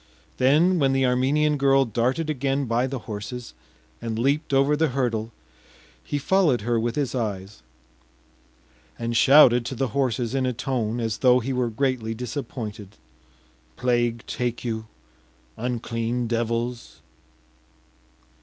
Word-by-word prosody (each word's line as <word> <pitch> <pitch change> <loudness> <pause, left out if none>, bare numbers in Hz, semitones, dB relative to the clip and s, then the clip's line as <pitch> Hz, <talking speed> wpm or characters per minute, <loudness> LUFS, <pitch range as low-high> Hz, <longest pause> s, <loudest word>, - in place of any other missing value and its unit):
Then 160 +8 +4
when 135 -2 +2
the 135 0 +2
Armenian 140 +4 +2
girl 135 0 +4
darted 125 +7 -1
again 140 -1 -1
by 120 +2 0
the 135 0 -4
horses 115 +4 -6 0.5
and 115 -1 -3
leaped 140 +7 0
over 140 +2 +3
the 160 +2 +2
hurdle, 120 -4 -2 0.7
he 145 - -3
followed 150 - +2
her 120 +2 0
with 115 +1 -2
his 145 -4 -1
eyes, 105 -4 -4 1.4
and 115 0 -3
shouted 125 -1 +6
to 135 - -4
the 130 +1 -1
horses 125 -1 -1
in 130 -1 0
a 125 - -1
tone 120 -2 -2
as 115 -2 -2
though 125 -1 +5
he 130 +3 -3
were 125 -2 0
greatly 115 -2 -1
disappointed: 110 -5 -6 0.8
“Plague 120 -2 0
take 120 0 -3
you, 110 -2 -3 0.7
unclean 120 0 -2
devils! 115 +1 -3
125 Hz, 130 wpm, -24 LUFS, 115-135 Hz, 1.4 s, shouted